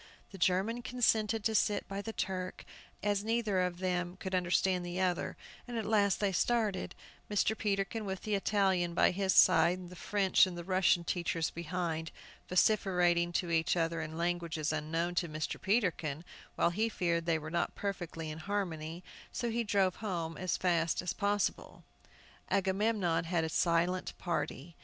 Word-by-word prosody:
The 195 - -10
German 190 +7 +1
consented 225 -2 +1
to 220 - +1
sit 210 -1 +1
by 195 0 -4
the 225 - -5
Turk, 185 -3 -4 0.4
as 205 -1 +1
they 210 - -9
neither 215 -5 +1
of 180 -1 0
them 180 -1 -2
could 190 -1 -6
understand 180 0 +2
the 175 +1 -4
other; 180 -2 0 0.3
and 240 -1 -4
at 220 - -2
last 205 -3 +2
they 205 -2 +1
started, 210 -1 0 0.3
Mr. 210 +1 +2
Peterkin 205 +1 -1
with 190 -2 -4
the 215 - -2
Italian 190 -4 +1
by - - +4
his 190 +1 0
side, 180 -1 +6
and 180 -1 -9
the - - -9
French 195 0 +3
and 180 -2 -6
Russian 185 -2 +3
teachers 170 -1 -1
behind, 165 -1 -3 0.4
vociferating 180 -3 +3
to 175 0 -1
each 165 +1 +2
other 165 -1 0
in 160 0 -6
languages 170 -2 -1
unknown 165 +3 -1
to 170 - -6
Mr. 155 0 -4
Peterkin, 175 -7 0 0.3
while 170 - +2
he 220 +6 0
feared 170 -5 -1
they 165 -1 +3
were 155 0 -7
not 170 - -1
perfectly 175 -5 -4
in 155 - -7
harmony, 170 -3 -3 0.3
so 235 -1 -2
he 235 +1 0
drove 195 -3 +1
home 170 -6 -3
as 185 +2 -1
fast 170 -2 +1
as 180 - -2
possible. 205 -1 -1 0.7
Agamemnon 195 -3 +1
had 165 -1 0
a 160 - -1
silent 170 +3 +1
party. 165 -1 -3
180 Hz, 165 wpm, -32 LUFS, 170-200 Hz, 0.7 s, side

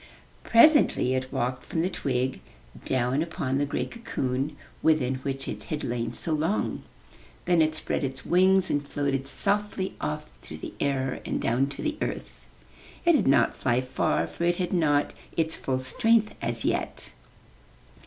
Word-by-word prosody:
Presently 235 - +5
it 130 0 -2
walked 125 +1 -2
from 160 - -2
the 175 - +1
twig 130 -6 -1 0.5
down 130 +2 +1
upon 140 -5 -1
the 145 - 0
gray - - -1
cocoon, 135 - -3 0.2
within 135 -5 +2
which 135 0 -4
it 105 -1 -6
had 150 +5 -4
lain 115 -1 -2
so 160 +6 -2
long. 160 +7 0 0.6
Then 175 -2 +4
it 155 0 +3
spread 155 - -2
its 135 -1 -4
wings 190 +1 +4
and 145 - +1
floated 140 -2 -2
softly 200 +3 0
off 75 -4 -4
through - - -9
the - - -7
air 135 -2 -1
and - - -2
down 125 +4 +1
to 140 - -7
the 310 0 -2
earth. - - -5 0.6
It 340 - +7
did 300 - +3
not 135 - +4
fly 125 -1 +1
far, 130 +1 0
for - - -6
it 175 0 +2
had 180 -1 -2
not 145 -5 +2 0.2
its 160 -1 +1
full 130 -1 -2
strength 215 - +2
as 120 -1 -2
yet. - - -1
140 Hz, 165 wpm, -27 LUFS, 130-175 Hz, 0.6 s, It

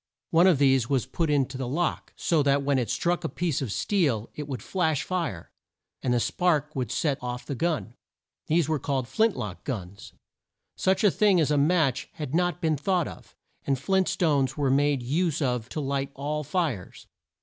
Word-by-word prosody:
One 170 +3 +6
of 180 -6 +5
these 135 -3 +3
was 135 -4 +1
put 160 +5 -2
in 145 -2 +3
the 130 -1 -5
lock, 170 +7 -2
so 165 -3 +1
that 140 0 +2
when 140 -1 +2
it 120 - -2
struck 175 0 0
a 160 - -1
piece 170 -6 -1
of 125 -6 -3
steel 140 - 0
it 150 -1 -6
would 130 -7 -5
flash 160 -6 0
fire, 170 - -3 0.5
and 125 - 0
the 120 - +3
spark 155 +1 0
would 125 -4 -2
set 140 +1 0
off 125 0 -5
the - - -4
gun. 155 -4 -1 0.5
These 160 -1 +2
were 155 -2 0
called 135 -2 -2
flint 220 - +1
lock 100 -4 -5
guns. 100 -6 -6 0.6
Such 190 +2 +1
a 205 - +6
thing 200 -2 +3
as 150 -2 +2
a - - +3
match 140 -4 +2
had 150 -3 -6
not 175 +1 +1
been 160 -3 +1
thought 180 +3 0
of, - - -12 0.3
and 135 -1 0
flint 190 +7 +1
stones 140 -6 +1
were 140 -3 +1
made 140 -1 +2
use 160 +5 0
of 125 -5 -1
to - - -4
light 140 -1 -1
all 150 +2 -3
fires. 150 - -3
145 Hz, 195 wpm, -26 LUFS, 130-170 Hz, 0.6 s, One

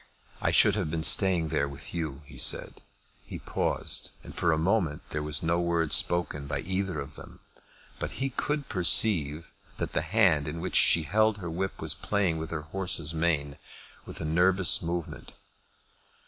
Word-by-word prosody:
"I - - +1
should 105 - +5
have 95 -6 -2
been 80 0 -3
staying 85 +2 +4
there 70 0 0
with 70 +1 -10
you," 75 -4 -5
he - - -11
said. - - +2 0.4
He - - -8
paused, - - -1
and - - -11
for 85 - 0
a 80 - +1
moment 85 -3 0
there 75 - -3
was 75 0 -2
no 85 +1 +1
word 85 -2 0
spoken 75 -5 +2
by 75 - -3
either 95 -1 -3
of 70 +1 -7
them; - - -13 0.6
but - - -4
he 135 0 -3
could 145 +2 -3
perceive 85 -4 +2 0.3
that - - -4
the - - 0
hand 90 -10 +2
in 80 +2 -5
which 95 - -5
she 85 - +4
held 110 +6 +1
her 85 -4 -6
whip 95 +3 -4
was 80 0 +2
playing 95 -5 -1
with 80 - -6
her 75 -2 -5
horse's 85 -1 -3
mane 80 -4 -1 0.5
with - - -9
a 80 - -5
nervous 90 +3 +3
movement. 85 -1 -5
85 Hz, 175 wpm, -27 LUFS, 75-95 Hz, 0.6 s, should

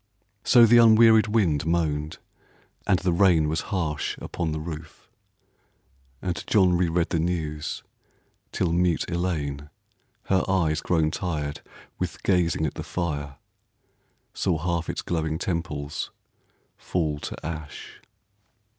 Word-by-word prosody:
So 120 -2 +7
the 120 +1 +6
unwearied 110 -1 +6
wind 95 -10 +1
Moaned, 80 -2 -1 0.7
and 95 - +4
the 90 -1 0
rain 85 -4 +4
was 80 +1 -1
harsh 80 -7 -2
upon 85 -3 -4
the 80 - -3
roof, 75 -1 -9 1.1
And 90 -1 -3
John 95 -5 +4
reread 85 -1 +1
the 85 - 0
news, 80 -3 -3 0.7
till 85 -3 0
mute 85 -1 +1
Elaine, 75 -5 -2 0.5
Her 95 -1 +1
eyes 80 -5 +1
grown 80 -3 +1
tired 75 -6 -3 0.4
with 90 -2 -4
gazing 85 -4 +2
at 75 - -2
the - - -6
fire, 75 -5 -4 1.0
Saw 90 -4 0
half 85 +1 -2
its - - -3
glowing 80 -2 -1
temples 80 -5 -3 0.7
fall 75 -5 -2
to - - -7
ash. 80 -3 -7
85 Hz, 120 wpm, -25 LUFS, 75-90 Hz, 1.1 s, So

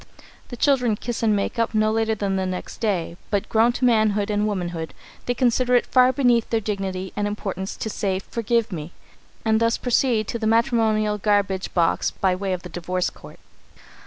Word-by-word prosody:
The 245 - -7
children 250 -5 +2
kiss 235 +2 -5
and 220 -2 +3
make 205 +4 -2
up 230 -1 0
no 215 0 +3
later 225 0 +1
than 200 -2 -1
the 190 -1 -1
next 185 0 -5
day, 180 -6 -1
but, 200 -2 -1
grown 225 +2 +4
to 250 - 0
manhood 215 -3 +2
and 210 0 +1
womanhood, 175 -5 -4 0.3
they 245 - 0
consider 250 0 +2
it 245 - +3
far 255 0 +4
beneath 245 -3 +2
their 225 - +1
dignity 195 -3 -4
and 205 0 -1
importance 195 -2 -4
to - - -4
say 195 -3 -1
"Forgive 230 +3 -1
me," 165 -1 -6 0.5
and 220 0 +3
thus 230 0 +2
proceed 240 -3 +1
to 235 - -3
the 220 - -1
matrimonial 220 -3 +2
garbage 200 -2 0
box 170 -2 +2
by 190 -1 0
way 190 +1 -3
of 180 -1 -3
the - - -7
divorce 180 +1 -2
court. - - -14
215 Hz, 190 wpm, -23 LUFS, 190-230 Hz, 0.5 s, grown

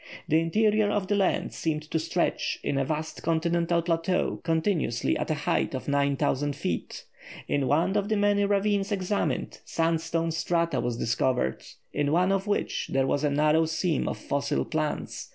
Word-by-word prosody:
The 160 - +4
interior 210 +5 +2
of 205 -2 0
the 205 - +1
land 195 -2 +1
seemed 155 -2 -2
to 160 - +1
stretch 160 - -1
in 135 - 0
a - - +2
vast 155 +2 -4
continental 170 +1 +1
plateau 165 +2 0
continuously 160 - 0
at - - -3
a 155 - +1
height 150 -2 0
of 130 - -6
9000 140 0 +1
feet. - - -4 0.4
In 140 -2 0
one 170 +8 +2
of 205 0 0
the 215 - +2
many 205 0 +3
ravines 200 0 +1
examined, 200 0 -1
sandstone 165 0 0
strata 170 +1 0
were 120 -1 -2
discovered, 120 - 0 0.3
in 145 0 0
one 180 +4 +3
of 195 +1 0
which 205 - -1
there 135 0 +2
was 140 +2 0
a 150 - +3
narrow 150 +3 +3
seam 160 -1 0
of - - -4
fossil 140 0 -1
plants. 155 -1 -3
165 Hz, 170 wpm, -27 LUFS, 145-190 Hz, 0.4 s, The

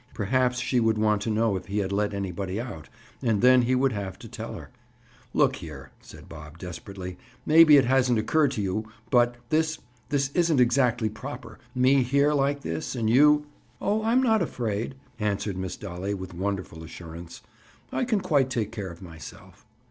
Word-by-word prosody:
Perhaps 125 +4 +1
she 130 -1 +1
would 110 -1 +2
want 105 -1 +2
to 115 - -2
know 110 -1 +1
if 95 -1 -5
he 100 +2 -3
had 100 -2 -1
let 105 +1 0
anybody 95 0 -3
out, 80 - -7 0.3
and 115 -4 +1
then 130 0 +7
he 125 +2 +1
would 135 +1 +2
have 100 -4 -5
to - - -11
tell - - -7
her— - - -10 0.6
"Look - - +2
here," 70 -5 -10
said - - -14
Bob 75 0 -11
desperately. 90 +1 -8 0.3
"Maybe 155 -1 +8
it 135 - +4
hasn't 125 -1 +3
occurred 145 +7 +2
to 105 - -2
you, 110 +3 -3 0.2
but—this—this 125 +2 0
isn't 165 -3 +2
exactly 120 -2 +3
proper. 120 +1 -8 0.2
Me 130 +2 +4
here, 140 +4 +2
like 140 0 +1
this, 80 0 -4
and 110 -2 0
you—" 150 +3 +5 0.3
"Oh, 210 +2 0
I'm 240 +4 +3
not 220 -4 +3
afraid," 115 +2 -2 0.2
answered 105 -2 -1
Miss 95 -1 -4
Dolly 95 +1 -4
with 95 -1 -8
wonderful 95 -3 -4
assurance. 85 +1 -10 0.5
"I - - -1
can 225 -5 +1
quite 145 -8 +2
take 115 -5 -2
care 105 -5 -5
of 85 +2 -11
myself." 80 -4 -12
115 Hz, 175 wpm, -26 LUFS, 95-135 Hz, 0.6 s, Maybe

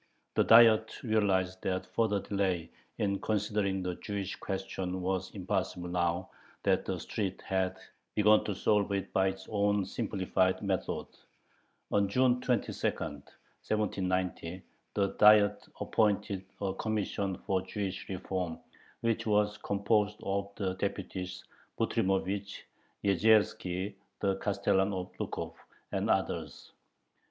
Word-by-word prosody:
The - - +4
Diet 110 -1 +6
realized 95 -5 +1
that 95 0 -1
further 105 -3 +1
delay 95 -5 -1 0.3
in 100 -2 0
considering 100 -2 0
the 90 0 -1
Jewish 100 +1 -4
question 95 -1 -3
was 95 0 -1
impossible 95 -2 -2
now 85 +1 0 0.3
that - - +2
the - - -2
street 95 -3 -3
had 95 -1 0 0.4
begun 105 0 +5
to 105 - -2
solve 105 +1 +2
it 100 -1 -3
by 95 0 +3
its 95 0 -4
own 100 -1 +1
simplified 95 -3 0
methods. 95 -3 -3 0.6
On 100 -1 +3
June 125 +2 +3
22, 125 -4 0
1790, 90 +3 -3 0.3
the 100 -1 +2
Diet 105 -1 +6
appointed 105 -3 +1
a 95 -2 -1
"Commission 100 -2 -2
for 95 -1 -1
Jewish 100 -1 -4
Reform," 90 -2 -3 0.4
which 115 -1 0
was 105 0 +2
composed 105 +1 +1
of 100 0 -1
the 95 -2 -1
deputies 95 -2 -4 0.4
Butrymovich, 95 +1 0 0.4
Yezierski, 100 -1 +2 0.3
the 100 -1 +1
Castellan 100 0 +1
of 90 -1 -4
Lukov, - - -4 0.4
and - - -1
others. - - -1
100 Hz, 115 wpm, -31 LUFS, 95-105 Hz, 0.6 s, Diet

